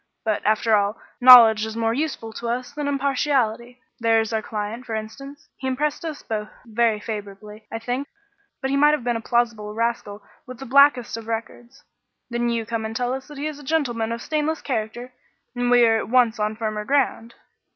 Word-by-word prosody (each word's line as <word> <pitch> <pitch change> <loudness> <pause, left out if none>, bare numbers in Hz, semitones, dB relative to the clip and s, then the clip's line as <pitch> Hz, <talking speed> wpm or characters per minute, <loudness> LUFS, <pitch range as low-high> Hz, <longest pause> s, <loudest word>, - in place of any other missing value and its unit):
But, 215 -2 -1
after 220 +1 +2
all, 205 +1 0 0.2
knowledge 235 -4 +9
is 220 0 -4
more 225 0 +1
useful 260 -5 -3
to 235 +1 -5
us 245 +1 -3
than 290 0 -4
impartiality. 255 -4 -1 0.2
There 225 -1 +3
is 225 0 -2
our 220 - 0
client, 215 +3 -5
for 225 -3 -5
instance. 275 +7 -8
He 265 - -5
impressed 290 +5 -1
us 315 -3 -6
both 215 -1 -4 0.2
very 225 -1 +1
favourably, 210 0 -8
I - - -3
think; 245 +5 -3 0.5
but 265 -1 -2
he - - +1
might 295 +1 +5
have 285 - -8
been 240 0 0
a 230 - -3
plausible 230 -3 -1
rascal 225 -3 -2 0.2
with 255 -1 -9
the 270 - -9
blackest 265 -3 +4
of 225 -1 -9
records. 235 +3 -6 0.5
Then 240 0 0
you 230 -1 -1
come 230 0 -3
and 220 0 -5
tell 245 +1 -1
us 265 0 -6
that 295 -1 -11
he 285 - -4
is 305 -1 -5
a - - -12
gentleman 245 -7 -1
of 235 +1 -4
stainless 310 0 -2
character 240 0 -4 0.4
and 245 0 0
we 245 -1 +6
are 225 -1 +3
at - - -6
once 240 -2 +3
on 210 +1 -1
firmer 215 -1 -3
ground." 240 -3 0
235 Hz, 205 wpm, -23 LUFS, 220-265 Hz, 0.5 s, knowledge